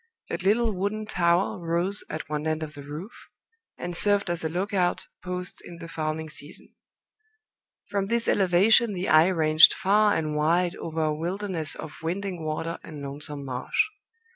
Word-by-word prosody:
A - - -1
little 220 +4 +2
wooden 205 +3 -2
tower 175 -2 +1
rose 175 +4 -1
at - - -5
one 150 +1 -3
end 155 0 -1
of 155 -1 -7
the 145 - -9
roof, 150 +9 -7 0.7
and 175 0 -5
served 200 0 +3
as 170 -1 -1
a 160 - -1
lookout 185 +1 0 0.2
post 180 0 -5
in 170 - -10
the 170 0 -9
fowling 160 -1 -3
season. 150 +1 -10 1.1
From 200 -1 -1
this 235 +1 +1
elevation 200 +4 +4
the 185 0 -3
eye 155 +2 +6
ranged 160 -3 +6
far 205 +2 +3
and 155 -1 -1
wide 170 +4 +2
over 160 -1 -3
a 155 -1 0
wilderness 175 -1 -2
of 155 - -8
winding 180 +1 -3
water 155 +2 -3
and 150 -3 -9
lonesome 140 +1 -5
marsh. 125 -1 -4
170 Hz, 165 wpm, -26 LUFS, 155-195 Hz, 1.1 s, eye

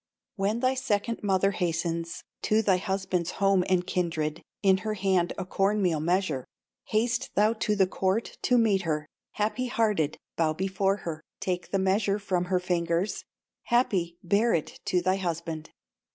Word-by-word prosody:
"When 210 +3 0
thy 255 0 +3
second 230 -3 -1
mother 195 -1 +2
hastens 170 -2 -2 0.2
To 220 +1 +2
thy 190 -3 +4
husband's 185 -2 -1
home 195 -2 +3
and 180 -1 +2
kindred, 165 -3 -1 0.2
In 190 -1 +5
her 215 +2 -3
hand 185 -3 +1
a 190 - -3
corn 195 +3 +1
meal 175 -6 +2
measure, 165 -4 0 0.4
Haste 230 +3 0
thou 210 +2 +4
to 215 -1 0
the 195 -2 +4
court 190 +4 -1
to 250 - +3
meet 215 -5 +3
her, 155 -4 -1 0.3
Happy 220 +4 -1
hearted, 210 -11 +1 0.2
bow 160 -2 +2
before 195 +3 0
her, 160 -2 -4 0.2
Take 180 -1 -2
the 195 - +1
measure 195 +1 +2
from 185 -3 -1
her 180 0 +1
fingers, 175 +1 -1 0.4
Happy, 190 -9 +1
bear 205 +6 +3
it 160 - -4
to 180 -1 +1
thy 185 +1 +2
husband. 165 -3 -4
190 Hz, 160 wpm, -28 LUFS, 170-210 Hz, 0.4 s, In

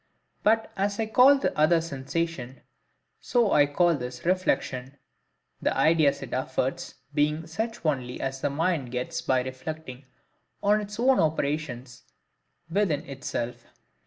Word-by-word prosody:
But 225 +1 +2
as 200 +1 -1
I 225 - +1
call 250 +6 +6
the 275 - -1
other 155 +3 +4
Sensation, 140 -3 -4 0.6
so 235 -4 +2
I 145 -1 +5
call 170 +4 +3
this 125 -2 -6
REFLECTION, 140 -7 0 0.6
the - - 0
ideas 155 0 +3
it - - -8
affords 130 0 -2 0.2
being 150 +2 +1
such 220 +6 -4
only 130 -5 -1
as 135 0 -3
the 145 - +1
mind 155 -2 0
gets 125 0 -3
by 130 -1 +1
reflecting 130 +1 -7 0.6
on 210 +1 +4
its 210 +1 -8
own 260 +2 +4
operations 145 -5 -1 0.7
within 165 -4 0
itself. 130 -4 -5
150 Hz, 130 wpm, -27 LUFS, 130-185 Hz, 0.7 s, call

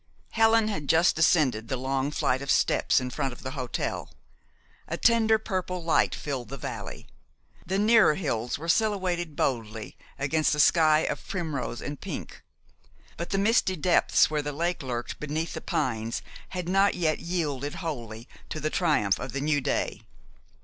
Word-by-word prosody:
Helen 225 -1 +4
had 155 -10 -4
just 165 +2 +4
descended 140 -9 +2
the 130 - -2
long 135 +2 -1
flight 130 -3 0
of 140 - -6
steps - - +3
in 125 -1 -4
front 135 -1 -2
of - - -13
the 130 - -4
hotel. 130 -3 -3 0.8
A - - -3
tender 225 -2 +4
purple 185 -4 -3
light 105 - +2
filled 125 +4 -5
the 135 - -6
valley. - - -7 0.6
The 190 - 0
nearer 215 -5 +5
hills 125 -9 -2
were 160 +3 -8
silhouetted 180 -5 0
boldly 110 -5 -2 0.2
against 150 +2 +1
a - - -4
sky 155 0 +5
of - - -3
primrose 155 -10 -3
and 145 -1 -6
pink; - - -7 0.7
but 170 - -5
the 195 - 0
misty 200 -2 +2
depths 175 +2 +3
where 155 -1 -1
the 145 0 -4
lake 170 +4 -1
lurked 120 -3 -4
beneath 155 +3 -3
the - - -5
pines 115 -6 -2 0.3
had 180 -2 -4
not 195 +2 +3
yet 160 -3 0
yielded 145 -5 -2
wholly 120 - -6 0.2
to 155 - -4
the 155 +1 -2
triumph 150 - +2
of 125 0 -6
the 135 - -2
new 145 0 +1
day. - - -1
150 Hz, 165 wpm, -27 LUFS, 130-180 Hz, 0.8 s, nearer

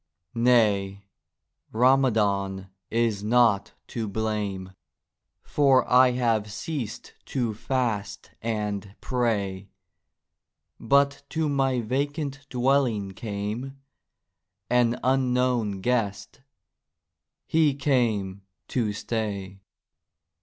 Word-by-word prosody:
Nay, 105 -5 +2 0.7
Ramadhan 105 -7 +2 0.2
is 115 -3 0
not 110 -2 +3 0.2
to 115 -2 -3
blame, 100 -3 -3 0.7
For 135 -3 +3
I 125 0 +5
have 115 -4 0
ceased 120 +2 -5
to 120 -4 -2
fast 115 -2 -2
and 105 -3 -3
pray; 100 -6 -1 1.1
But 140 0 +2
to 160 -1 -1
my 135 -3 +1
vacant 140 +4 -3
Dwelling 125 -6 +1
came 105 +6 -5 0.9
An 125 0 +3
unknown 125 -5 +1
Guest—he 125 +6 -3
came 115 -9 0 0.3
to 110 -5 0
stay. 100 -3 -4
115 Hz, 75 wpm, -26 LUFS, 100-130 Hz, 1.1 s, I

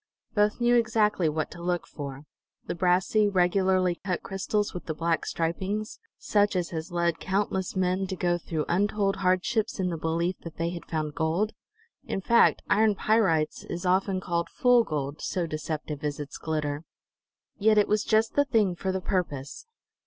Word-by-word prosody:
Both 210 +1 +2
knew 240 0 +4
exactly 215 -7 +2
what 155 0 -2
to 175 - -10
look 175 0 -1
for: 140 -1 -7 0.4
the - - -3
brassy, 185 +4 +2
regularly 185 -1 +2
cut 185 -3 -2
crystals 205 +2 -1
with 180 - -7
the 160 - -2
black 165 +1 0
stripings, 190 +6 -2 0.2
such 205 -1 +1
as 180 -2 -1
has 165 +1 -5
led 170 -1 0
countless 190 -1 -1
men 185 +1 0
to 190 - -3
go 175 -1 0
through 160 -3 -3
untold 200 +2 +1
hardships 195 +4 0
in 185 -1 +1
the 165 - -4
belief 170 +3 -1
that 165 -1 -10
they 170 +1 -1
had 175 -1 -8
found 155 -2 -2
gold. 170 +8 0 0.5
In - - -3
fact, 235 +5 +4
iron 215 -1 +3
pyrites 190 -9 +1
is 175 +2 -5
often 185 +1 +2
called 170 -2 -2
"fool 245 -2 +4
gold," 145 -4 -4
so 180 -3 -1
deceptive 155 -2 -4
is 145 -1 -2
its 145 -1 -7
glitter. 150 -1 -2 0.8
Yet, 215 +1 +4
it 205 - +5
was 210 0 +1
just 220 +1 +2
the 285 - +3
thing 215 -9 +2
for 190 +2 -2
the 190 0 -2
purpose. 175 - -3
180 Hz, 175 wpm, -27 LUFS, 165-205 Hz, 0.8 s, it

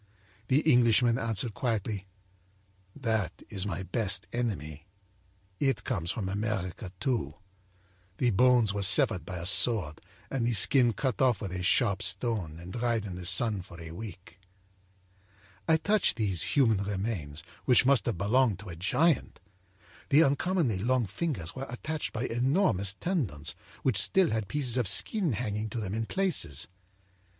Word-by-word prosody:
âThe 140 +4 +2
Englishman 120 -3 +4
answered 115 -1 0
quietly: 105 -5 -3 0.9
â'That 110 -6 0 0.2
is 100 -1 -4
my 95 -1 -4
best 95 0 -1
enemy. 80 -10 -4 0.7
It 135 -2 0
comes 85 -10 -3
from 100 0 -3
America, 100 -2 -3
too. 105 - -2 0.8
The 125 -2 +1
bones 120 -1 +3
were 100 - -3
severed 95 -2 +5
by 90 - -5
a 85 - -6
sword 90 -5 +2 0.3
and 125 -3 -1
the 120 - +1
skin 120 +3 +5
cut 130 -1 -2
off 125 -4 +3
with 100 -4 -5
a 90 0 -4
sharp 100 +1 +2
stone 95 -4 -1
and 90 +2 -10
dried 115 -3 -1
in 95 -3 -6
the 90 -1 -4
sun 105 +1 +3
for 85 -1 -13
a 80 -1 -9
week.' 95 0 -10 1.3
âI 160 0 +3
touched 210 -1 +2
these 100 -7 -1
human 115 -7 +3
remains, 95 -7 -4 0.2
which 125 0 +5
must 135 -1 +3
have 115 - -1
belonged 110 +3 +2
to 100 0 -11
a 85 - -7
giant. 140 - 0 0.7
The 155 +2 +6
uncommonly 145 - 0
long 125 +3 +1
fingers 100 - -4
were 135 +1 -6
attached 150 +6 -4
by 115 - -4
enormous 120 - +1
tendons 95 - -3 0.3
which 125 -7 +2
still 190 -4 +2
had 110 -2 -2
pieces 130 -3 0
of 120 -5 +1
skin 180 - +3
hanging 110 -1 -3
to 115 - -5
them 100 -3 -4
in 110 0 -3
places. 115 - 0
110 Hz, 155 wpm, -29 LUFS, 95-125 Hz, 1.3 s, The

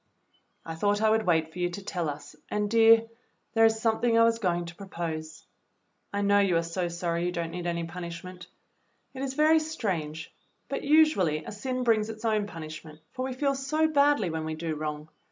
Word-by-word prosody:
"I 165 - -5
thought 205 +5 +1
I 220 0 +3
would 220 -2 +1
wait 160 -2 +2
for 180 - -8
you 175 0 +1
to 190 +3 -7
tell 175 -6 -2
us, 145 +1 -8
and, 210 0 -1
dear, 225 0 +6 0.5
there 225 0 +5
is 220 0 +3
something 230 +1 +2
I 230 - +6
was 230 0 +3
going 175 -4 0
to 170 - -8
propose. 165 -4 -6 0.7
I 200 0 -1
know 200 0 +4
you 190 -4 +3
are 165 - +1
so 175 +2 -2
sorry 170 0 -2
you - - -1
don't 170 -2 -3
need 175 0 -4
any 170 0 -1
punish 170 0 -7
ment. 180 0 -10 0.7
It 265 - -7
is 270 -1 -3
very 310 +2 +5
strange, 185 - -4 0.3
but - - -3
usually 280 - +3
a - - -6
sin 255 +4 -3
brings 225 -2 +2
its 220 +1 -7
own 215 -2 +1
punishment, 155 -2 -9
for 255 - -4
we 260 - -3
feel 275 +2 0
so 305 +4 +1
badly 285 - +3
when 160 0 -3
we 160 0 -3
do 160 0 -3
wrong. 150 0 -4
190 Hz, 210 wpm, -28 LUFS, 165-230 Hz, 0.7 s, dear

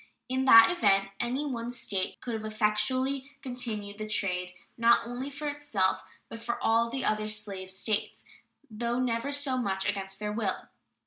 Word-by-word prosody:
In 260 +1 0
that 230 +2 +9
event 195 - +3
any 255 +5 -1
one 240 -4 -3
State 205 -6 -3
could 240 - -4
have 220 -1 -3
effectually 255 +6 0
continued 220 -6 -4
the 215 - -4
trade, 180 -4 0 0.2
not 235 0 +4
only 245 +3 -4
for 290 +2 -5
itself, 285 -10 0 0.3
but 230 0 -9
for 235 +1 -2
all 230 +1 +3
the 260 +2 -3
other 215 0 0
slave 205 -3 -4
States, 200 +3 -2 0.4
though 235 +2 -2
never 245 +2 0
so 285 -2 +1
much 190 -5 -1
against 195 -1 -2
their 210 0 -3
will. 210 -4 -2
230 Hz, 165 wpm, -29 LUFS, 205-255 Hz, 0.4 s, that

